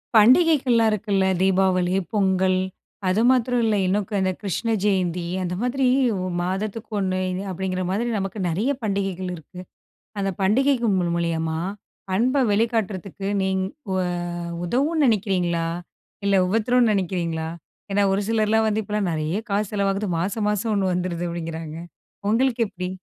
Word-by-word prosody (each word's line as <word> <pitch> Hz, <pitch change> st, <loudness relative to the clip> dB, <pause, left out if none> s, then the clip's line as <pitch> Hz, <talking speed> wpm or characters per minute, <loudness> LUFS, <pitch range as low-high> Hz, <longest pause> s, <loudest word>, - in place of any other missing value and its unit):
பண்டிகைகள்லாம் 250 Hz, -1 st, +5 dB
இருக்குல்ல 200 Hz, -2 st, +1 dB, 0.2 s
தீபாவளி, 185 Hz, -1 st, +2 dB, 0.2 s
பொங்கல் 190 Hz, -2 st, +2 dB, 0.5 s
அது 185 Hz, +4 st, +2 dB
மாத்திரம் 250 Hz, -1 st, +2 dB
இல்ல 220 Hz, -2 st, +2 dB
இன்னும் 200 Hz, +2 st, +1 dB, 0.2 s
இந்த 185 Hz, 0 st, +1 dB
கிருஷ்ண 210 Hz, +3 st, -2 dB
ஜெயந்தி. 180 Hz, -4 st, +1 dB, 0.2 s
அந்த 180 Hz, 0 st, -2 dB
மாதிரி 260 Hz, +2 st, +1 dB, 0.6 s
மாதத்துக்கு 205 Hz, +5 st, -3 dB
1 185 Hz, -1 st, 0 dB, 0.3 s
அப்படிங்கிற 185 Hz, 0 st, -2 dB
மாரி 205 Hz, +5 st, 0 dB
நமக்கு 195 Hz, +2 st, -4 dB
நிறைய 205 Hz, +12 st, 0 dB
பண்டிகைகள் 195 Hz, -3 st, -2 dB
இருக்கு. 165 Hz, +3 st, -12 dB, 0.6 s
அந்த 195 Hz, -, 0 dB
பண்டிகைக்கு 240 Hz, +5 st, +3 dB
மூலி 175 Hz, -2 st, 0 dB
மூலியமா 160 Hz, -1 st, -1 dB, 0.5 s
அன்பை 250 Hz, +8 st, +2 dB
வெளிக்காட்டுறதுக்கு, 200 Hz, -3 st, -1 dB
நீங்க 190 Hz, 0 st, 0 dB, 0.3 s
உ -, -, 0 dB, 0.7 s
உதவும்னு 285 Hz, -, +1 dB
நினைக்கிறீங்களா? 185 Hz, -6 st, +1 dB, 0.6 s
இல்ல 200 Hz, 0 st, +3 dB
உபத்தரம் 230 Hz, +4 st, +3 dB
நினைக்கிறீங்களா? 170 Hz, -4 st, -1 dB, 0.4 s
ஏன்னா 200 Hz, +1 st, +3 dB
ஒரு 195 Hz, -, +1 dB
சிலர்லாம் 220 Hz, 0 st, +2 dB
வந்து, 215 Hz, 0 st, +1 dB
இப்பலாம் 210 Hz, -2 st, -1 dB
நிறைய 155 Hz, +3 st, -1 dB
காசு 200 Hz, 0 st, 0 dB
செலவாகுது 200 Hz, 0 st, 0 dB
மாசம் 205 Hz, +4 st, -1 dB
மாசம் 210 Hz, +2 st, -1 dB
1 195 Hz, -2 st, +1 dB
வந்துடுது 175 Hz, -1 st, -2 dB
அப்படிங்கிறாங்க. 165 Hz, -2 st, -5 dB, 0.5 s
உங்களுக்கு 240 Hz, +2 st, +2 dB
எப்படி? 180 Hz, -2 st, -5 dB
195 Hz, 130 wpm, -23 LUFS, 185-220 Hz, 0.7 s, பண்டிகைகள்லாம்